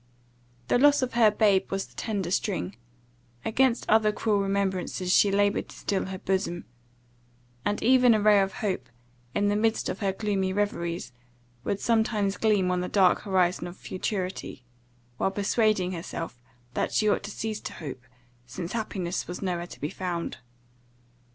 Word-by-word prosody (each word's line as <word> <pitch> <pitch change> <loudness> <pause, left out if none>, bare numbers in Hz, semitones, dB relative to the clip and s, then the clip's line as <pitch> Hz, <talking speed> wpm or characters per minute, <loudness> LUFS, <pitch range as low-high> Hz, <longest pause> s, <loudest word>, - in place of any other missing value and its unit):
The - - +3
loss 290 0 +5
of 255 - -2
her 230 -2 +6
babe 205 -2 +3
was 195 0 -1
the - - -21
tender 200 -6 -3
string; 95 - -1 0.7
against 255 +1 +2
other 215 -1 +4
cruel 210 -1 +1
remembrances 190 -2 0
she 205 - +5
laboured 200 +1 +1
to - - -12
steel 195 -2 -1
her 190 0 -5
bosom; 185 -2 -2 1.0
and 205 - -1
even 250 -1 +6
a - - +2
ray 210 -1 +5
of 195 0 0
hope, 190 -3 -2 0.5
in 205 0 +2
the 205 - +1
midst 220 +1 +1
of - - -4
her 200 -3 +1
gloomy 195 -1 -1
reveries, 170 -7 -2 0.5
would 200 - -1
sometimes 220 -3 +1
gleam 205 -4 +2
on 180 0 0
the 180 - -3
dark 190 -3 +4
horizon 185 -3 +1
of 175 - -10
futurity, 185 - -4 0.5
while - - +1
persuading 200 -1 +1
herself 165 -7 -6 0.3
that - - -1
she 215 - +2
ought 210 - +2
to 205 - -7
cease 215 0 -4
to - - -7
hope, 135 -5 -7 0.5
since 165 +8 -6
happiness 195 -6 -3
was 175 +3 -6
no 180 -2 0
where 175 0 -5
to - - -12
be 150 - -3
found. 175 -2 -3
195 Hz, 165 wpm, -27 LUFS, 180-215 Hz, 1.0 s, her